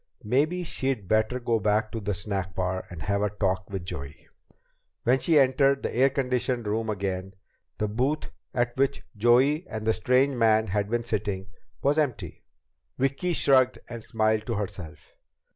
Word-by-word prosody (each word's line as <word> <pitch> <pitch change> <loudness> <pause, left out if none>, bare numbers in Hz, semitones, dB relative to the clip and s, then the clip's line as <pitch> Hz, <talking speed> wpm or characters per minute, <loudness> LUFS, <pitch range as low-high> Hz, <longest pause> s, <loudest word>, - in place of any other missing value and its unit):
Maybe 150 +11 +1
she'd 130 - -2
better 110 +4 +1
go 120 -2 0
back 105 +1 +1
to 115 - -4
the 100 -1 -2
snack 95 -2 -3
bar 95 0 -2
and 85 -3 -8
have 100 0 0
a 105 - +1
talk 95 -2 -1
with 95 -3 -5
Joey. 70 -4 -7 0.8
When 125 +3 +3
she 160 +1 +4
entered 135 0 +3
the - - -3
air 130 +3 +5
conditioned 125 -3 -1
room 110 +2 -1
again, 95 -2 -3 0.4
the 105 - 0
booth 130 +8 -1 0.2
at 120 -1 -1
which 135 0 +1
Joey 130 - +3
and 110 0 -5
the 110 - +3
strange 130 +5 +2
man 110 -1 +4
had 100 +1 -1
been 120 +1 0
sitting 100 -4 -2 0.3
was 145 +3 +3
empty. 140 -7 -2 0.5
Vicki 135 +7 0
shrugged 130 -4 +4
and 115 -2 -7
smiled 110 -2 0
to 115 - -1
herself. 85 -7 -6
110 Hz, 165 wpm, -26 LUFS, 100-130 Hz, 0.8 s, air